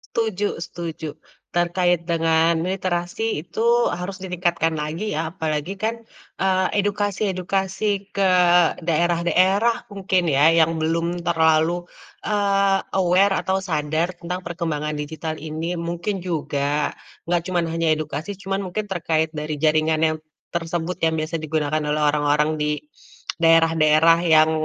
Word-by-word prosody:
Tuju 210 -4 -1
setuju, 165 -2 -6 0.4
terkait 175 0 +1
dengan 165 -1 +2 0.2
literasi 185 +2 -2
itu 225 - -3 0.4
harus 190 +2 -5
ditingkatkan 175 -3 -1
lagi 155 +6 -3
ya 160 +1 -2
apalagi 160 +2 -3
kan, 230 +2 -2 0.3
eee, 190 -1 +1 0.2
edukasi-edukasi 200 0 -1
ke 195 -1 +2 0.5
daerah-daerah 175 +7 +2
mungkin 190 -3 0
ya 150 +2 +5
yang 165 +1 +3
belum 165 +2 -1
terlalu, 160 +1 +2 0.4
eee, 200 -2 +2 0.2
aware 190 +2 +3
atau 190 0 -1
sadar 160 0 -1
tentang 180 +2 -5
perkembangan 165 -4 -3
digital 155 +1 -5
ini 160 +3 -4
mungkin 175 +4 -3
juga, 150 -4 -1 0.3
nggak 175 0 0
cuman 175 -2 0
hanya 165 0 -1
edukasi 155 +5 -5
cuman 195 0 -3
mungkin 205 +2 -4
terkait 160 -3 0
dari 155 -1 -4
jaringan 155 0 +2
yang 155 0 +2 0.4
tersebut 170 +1 -3
yang 160 0 +1
biasa 160 +1 -2
digunakan 155 -1 -1
oleh 150 0 -1
orang-orang 150 +1 +2
di, 150 0 -1 0.6
daerah-daerah 165 0 +5
yang, 155 -1 +5
170 Hz, 120 wpm, -22 LUFS, 155-185 Hz, 0.6 s, ya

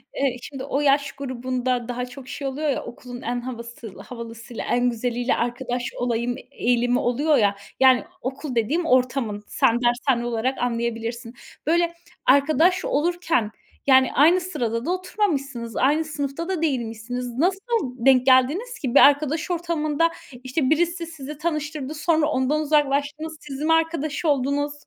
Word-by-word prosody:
Eee, 270 -3 0
şimdi 265 0 -7
o 280 +1 -1
yaş 280 -1 +3
grubunda 255 -2 -2
daha 245 0 -3
çok 255 +1 -11
şey 280 0 -5
oluyor 295 +3 -2
ya, 275 - -1
okulun 245 +1 -9
en 245 0 -2
havası 235 -4 -8
havalısıyla, 230 +1 -8
en 245 0 +2
güzeliyle 245 +1 -1
arkadaş 245 +1 -2
olayım, 245 0 -1
eee, - - -13
eğilimi 245 -1 +1
oluyor 285 +5 +2
ya. 205 -3 +3 0.2
Yani 260 -1 +6 0.2
okul 265 +1 -5
dediğim, 290 +10 +1
ortamın, 250 -6 +1
sen 235 +1 +2
dershane 240 0 +1
olarak 240 +3 -1
anlayabilirsin. 235 0 -3 0.3
Böyle, 340 +1 +2 0.3
arkadaş 310 +7 +4
olurken 320 - 0 0.4
yani 260 -1 +5
aynı 335 +6 +5
sırada 235 -9 -2
da 345 - 0
oturmamışsınız, 285 - -2
aynı 295 +5 +2
sınıfta 300 +3 -4
da 365 -4 -1
değilmişsiniz. 245 -3 -2
Nasıl 370 +6 +2 0.5
denk 260 -2 +6
geldiniz 280 - +3
ki? 260 -1 -3
Bir - - +9
arkadaş 300 +4 +4
ortamında, 330 -2 0 0.3
işte, 260 +1 0
birisi 340 +2 +1
sizi 300 -2 -8
tanıştırdı, 305 -3 -3
sonra 315 0 +1
ondan 295 +1 +1
uzaklaştınız, 300 +1 0
siz 275 -1 -7
mi 325 +2 +3
arkadaş 325 -2 0
oldunuz? 285 0 +1
270 Hz, 145 wpm, -23 LUFS, 245-310 Hz, 0.5 s, Bir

